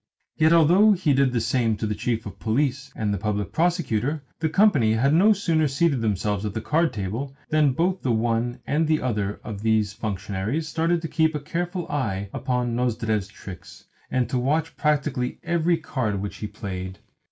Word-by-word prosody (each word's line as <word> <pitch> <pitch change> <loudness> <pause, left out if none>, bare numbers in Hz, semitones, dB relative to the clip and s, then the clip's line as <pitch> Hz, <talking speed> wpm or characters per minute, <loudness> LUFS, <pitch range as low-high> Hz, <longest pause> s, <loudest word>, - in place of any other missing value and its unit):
Yet 160 +1 +4
although 175 +6 +6
he 175 -6 +1
did 135 -1 +3
the 120 - 0
same 115 -1 +1
to 110 - -3
the 105 - -1
Chief 115 +1 -2
of 100 -3 -9
Police 135 +4 -1
and 105 -2 -1
the 100 - -2
Public 105 -1 -2
Prosecutor, 150 - 0 0.2
the 160 -1 0
company 155 - +4
had 135 +6 +2
no 195 +7 +6
sooner 165 -6 +2
seated 140 -1 +1
themselves 105 -1 -1
at 105 -2 -4
the - - 0
card 155 +9 +1
table 110 +8 -4
than 150 -3 +3
both 180 +6 0
the 130 - 0
one 115 +2 0
and 155 +2 +1
the 155 0 +2
other 105 -5 -2
of 105 -3 -6
these 110 -2 +1
functionaries 105 +6 -3
started 165 +1 0
to - - -2
keep 160 0 +1
a - - -1
careful 175 +4 -3
eye 100 -9 -2
upon 125 -2 -1
Nozdrev's 115 -4 0
tricks, 95 -3 -11 0.2
and 130 -1 0
to 125 - -1
watch 155 +6 0
practically 145 -4 0
every 170 0 +1
card 115 -10 -2
which 100 +1 -5
he 105 - -4
played. 95 -3 -6
125 Hz, 185 wpm, -24 LUFS, 110-160 Hz, 0.2 s, although